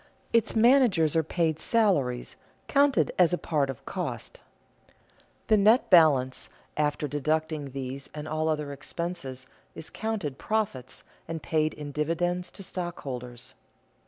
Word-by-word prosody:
Its 230 Hz, -1 st, +2 dB
managers 225 Hz, -, +4 dB
are 160 Hz, -, +5 dB
paid 160 Hz, 0 st, -1 dB
salaries, 155 Hz, -, +1 dB, 0.3 s
counted 280 Hz, -2 st, +3 dB
as 180 Hz, -1 st, +5 dB
a -, -, +2 dB
part 145 Hz, -6 st, 0 dB
of 135 Hz, -, -7 dB
cost. -, -, -5 dB, 1.1 s
The 215 Hz, -, +4 dB
net 215 Hz, +5 st, +4 dB
balance, 140 Hz, -7 st, +5 dB, 0.3 s
after 150 Hz, 0 st, 0 dB
deducting 155 Hz, +1 st, -1 dB
these 135 Hz, +1 st, -6 dB
and 150 Hz, 0 st, -6 dB
all 155 Hz, +1 st, -1 dB
other 150 Hz, -2 st, -2 dB
expenses, 140 Hz, -3 st, -5 dB, 0.3 s
is 160 Hz, 0 st, -6 dB
counted 205 Hz, -12 st, -3 dB
profits 130 Hz, -, -2 dB, 0.2 s
and 165 Hz, -1 st, -5 dB
paid 155 Hz, -1 st, 0 dB
in 145 Hz, -1 st, -7 dB
dividends 175 Hz, +4 st, -1 dB
to 195 Hz, -, -9 dB
stockholders. 125 Hz, -10 st, -6 dB
155 Hz, 130 wpm, -27 LUFS, 140-180 Hz, 1.1 s, are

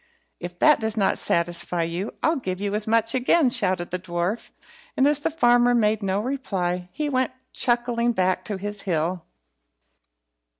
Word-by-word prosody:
"If 175 Hz, 0 st, -7 dB
that 300 Hz, +8 st, +5 dB
does 220 Hz, 0 st, -2 dB
not 200 Hz, -, +1 dB
satisfy 175 Hz, 0 st, 0 dB
you, 170 Hz, +5 st, -4 dB
I'll 320 Hz, 0 st, +2 dB
give 185 Hz, -8 st, -4 dB
you 200 Hz, 0 st, -2 dB
as 210 Hz, 0 st, -2 dB
much 225 Hz, +1 st, +2 dB
again," 260 Hz, +2 st, +3 dB
shouted 185 Hz, -6 st, +1 dB
the 180 Hz, -, -2 dB
dwarf; 175 Hz, +5 st, -3 dB, 0.5 s
and 265 Hz, -, +4 dB
as 295 Hz, -1 st, +3 dB
the 325 Hz, +3 st, -1 dB
farmer 245 Hz, -5 st, +3 dB
made 215 Hz, -2 st, +2 dB
no 195 Hz, 0 st, -1 dB
reply, 185 Hz, -8 st, -3 dB
he 300 Hz, +10 st, -3 dB
went 260 Hz, -2 st, 0 dB, 0.2 s
chuckling 240 Hz, -1 st, +1 dB
back 185 Hz, -3 st, 0 dB
to 205 Hz, -, -4 dB
his 205 Hz, +1 st, -5 dB
hill. 175 Hz, -1 st, -2 dB
210 Hz, 165 wpm, -24 LUFS, 180-245 Hz, 0.5 s, that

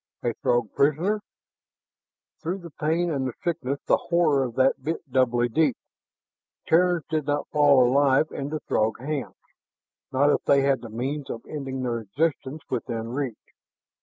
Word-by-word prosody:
A 120 Hz, -, 0 dB
Throg 120 Hz, -3 st, +1 dB
prisoner! 165 Hz, +9 st, +2 dB, 1.2 s
Through 180 Hz, +3 st, -3 dB
the 170 Hz, -2 st, -10 dB
pain 165 Hz, +4 st, 0 dB
and 135 Hz, -3 st, -1 dB
the 125 Hz, -, -4 dB
sickness 140 Hz, -6 st, -1 dB
the -, -, +4 dB
horror 160 Hz, -5 st, +2 dB
of 120 Hz, -2 st, -7 dB
that 130 Hz, +1 st, +2 dB
bit 165 Hz, 0 st, -3 dB
doubly 120 Hz, -2 st, +2 dB
deep. 140 Hz, +1 st, +1 dB, 0.9 s
Terrans 175 Hz, -2 st, +3 dB
did 155 Hz, -2 st, -2 dB
not 145 Hz, 0 st, 0 dB
fall 140 Hz, -4 st, +5 dB
alive 140 Hz, +3 st, +3 dB
into 145 Hz, +2 st, -4 dB
Throg 110 Hz, +1 st, 0 dB
hands, 140 Hz, +1 st, -4 dB, 0.8 s
not 140 Hz, +2 st, +3 dB
if -, -, +1 dB
they 140 Hz, -1 st, +5 dB
had 135 Hz, -3 st, +2 dB
the 120 Hz, -, -8 dB
means 135 Hz, +6 st, -4 dB
of 115 Hz, -, -6 dB
ending 135 Hz, -3 st, -4 dB
their 120 Hz, -2 st, -1 dB
existence 145 Hz, +6 st, -2 dB
within 115 Hz, -2 st, -3 dB
reach. 130 Hz, -3 st, -3 dB
140 Hz, 155 wpm, -25 LUFS, 125-155 Hz, 1.2 s, fall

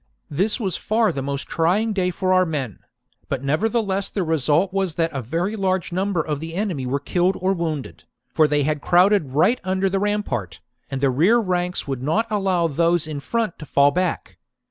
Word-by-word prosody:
This 195 Hz, -, 0 dB
was 190 Hz, -7 st, -1 dB
far 220 Hz, 0 st, +1 dB
the 135 Hz, -, -4 dB
most 140 Hz, +1 st, -4 dB
trying 195 Hz, +7 st, +1 dB
day 185 Hz, -2 st, +1 dB
for 185 Hz, +1 st, 0 dB
our 185 Hz, 0 st, +5 dB
men; 145 Hz, -, -4 dB, 0.5 s
but 135 Hz, -1 st, -2 dB
nevertheless 200 Hz, +6 st, 0 dB
the 195 Hz, -, -2 dB
result 160 Hz, +3 st, +1 dB
was 190 Hz, -5 st, -1 dB
that 165 Hz, -1 st, 0 dB
a 135 Hz, -, -3 dB
very 170 Hz, -, -2 dB
large 190 Hz, -4 st, -1 dB
number 185 Hz, -1 st, 0 dB
of 150 Hz, -2 st, -3 dB
the 165 Hz, +2 st, -7 dB
enemy 180 Hz, -10 st, -2 dB
were 140 Hz, +3 st, 0 dB
killed 180 Hz, +6 st, 0 dB
or 190 Hz, +1 st, +1 dB
wounded, 160 Hz, -6 st, -4 dB, 0.3 s
for 155 Hz, -, +4 dB
they 145 Hz, -1 st, +1 dB
had 150 Hz, 0 st, -1 dB
crowded 180 Hz, -5 st, +3 dB
right 190 Hz, -, +3 dB
under 190 Hz, 0 st, 0 dB
the 195 Hz, -, +1 dB
rampart, 165 Hz, -, -2 dB, 0.3 s
and 135 Hz, -1 st, -4 dB
the 135 Hz, -2 st, +3 dB
rear 175 Hz, -, +4 dB
ranks 180 Hz, -5 st, -1 dB
would 135 Hz, -3 st, -3 dB
not 160 Hz, -, +1 dB
allow 190 Hz, -5 st, +1 dB
those 170 Hz, +2 st, +1 dB
in 155 Hz, -2 st, -5 dB
front 225 Hz, +6 st, -2 dB
to 150 Hz, -, -8 dB
fall 140 Hz, 0 st, +4 dB
back. 180 Hz, +2 st, -2 dB
175 Hz, 195 wpm, -22 LUFS, 145-195 Hz, 0.5 s, our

